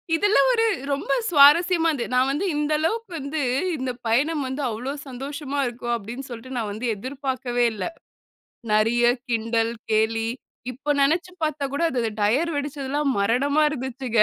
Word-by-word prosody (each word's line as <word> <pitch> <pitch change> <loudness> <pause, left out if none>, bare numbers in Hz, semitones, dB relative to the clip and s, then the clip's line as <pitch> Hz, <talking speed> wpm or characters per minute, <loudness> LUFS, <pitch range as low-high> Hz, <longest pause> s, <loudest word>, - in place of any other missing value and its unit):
இதெல்லாம் 410 +8 +4
ஒரு 455 -1 +2 0.3
ரொம்ப 280 - -3 0.2
சுவாரஸ்யமா 330 +3 +6
இருந்தது. 255 -5 -3
நான் 255 +1 +3
வந்து 320 +8 -1
இந்த 300 +1 0
அளவுக்கு 440 +6 -1
வந்து, 285 +2 -3 0.4
இந்த 260 -1 -2 0.2
பயணம் 285 +6 +1
வந்து 265 +3 -4
அவ்ளோ 240 +5 -4 0.2
சந்தோஷமா 280 +2 -5
இருக்கும் 240 0 -3
அப்படின்னு 235 +5 -7
சொல்ட்டு 250 +2 -8
நான் 220 -3 -2
வந்து 225 +4 -5
எதிர்பாக்கவே 255 0 -2
இல்ல. 210 - -4 0.9
நெறைய 225 +3 +3 0.3
கிண்டல், 230 0 0 0.2
கேலி, 225 +1 +1 0.4
இப்போ 275 +4 -3
நெனச்சு 340 +6 +2
பார்த்தா 305 -2 -1
கூட, 285 - -1
அது 235 -3 0
டையர் 270 +12 +2
வெடுச்சது 285 -1 -4
எல்லாம் 290 -1 +1
மரணமா 270 +9 +2
இருந்துச்சுங்க. 260 -4 -2
265 Hz, 150 wpm, -24 LUFS, 235-295 Hz, 0.9 s, சுவாரஸ்யமா